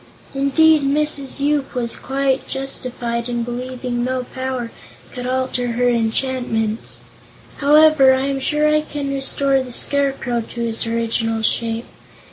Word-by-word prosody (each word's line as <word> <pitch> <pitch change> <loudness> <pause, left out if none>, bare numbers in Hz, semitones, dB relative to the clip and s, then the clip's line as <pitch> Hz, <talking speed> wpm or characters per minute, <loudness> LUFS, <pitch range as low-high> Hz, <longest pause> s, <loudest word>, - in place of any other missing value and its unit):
Indeed, 300 +3 +4
Mrs. 280 -1 0
Yoop 285 -1 0
was 235 -2 -2
quite 270 0 -1
justified 245 -3 -3
in 240 -1 -1
believing 245 0 -4
no 255 0 -1
power 260 -2 -4 0.4
could 250 -1 -5
alter 255 -2 -1
her 245 +1 +1
enchantments. 230 -1 -1 0.6
However, 300 -1 +6
I 260 - -1
am 275 -1 -1
sure 300 +3 +1
I 305 0 +3
can 285 -2 -4
restore 275 0 +1
the 255 -1 -7
Scarecrow 270 -2 +1
to 235 +1 -7
his 230 0 -1
original 225 -1 -1
shape. 230 +1 0
260 Hz, 130 wpm, -20 LUFS, 235-275 Hz, 0.6 s, However